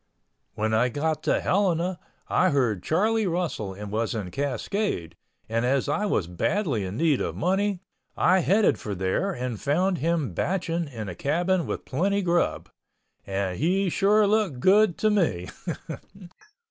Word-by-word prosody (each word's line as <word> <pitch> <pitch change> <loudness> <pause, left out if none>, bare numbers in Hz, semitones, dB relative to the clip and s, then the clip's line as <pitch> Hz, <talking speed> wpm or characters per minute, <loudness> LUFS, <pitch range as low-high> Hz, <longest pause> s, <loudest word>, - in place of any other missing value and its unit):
When 110 +1 -1
I 120 +3 +3
got 155 +4 -1
to - - +2
Helena 180 -2 +1 0.3
I 185 - +3
heard 120 - +1
Charlie 215 - +1
Russell 165 - -2
was 105 +3 -3
in 100 -5 -4
Cascade 135 - -2 0.3
and 115 +1 -1
as 130 +2 +1
I 205 +9 0
was 105 - +1
badly 115 - -1
in 95 +3 -5
need 155 -4 +2
of - - -2
money, 190 +2 0 0.3
I 185 +1 +4
headed 200 +4 +3
for 105 -2 -4
there 95 - 0
and 125 - -4
found 180 +6 +1
him 160 - 0
batching 170 - -1
in 115 -6 -7
a 90 - -5
cabin 170 - 0
with - - -4
plenty 195 +8 0
grub—and 100 - -3
he 185 +3 +1
sure 205 +3 +4
looked 200 - +1
good 200 +4 +4
to 215 - +2
me. 125 - 0
160 Hz, 145 wpm, -26 LUFS, -, 0.3 s, I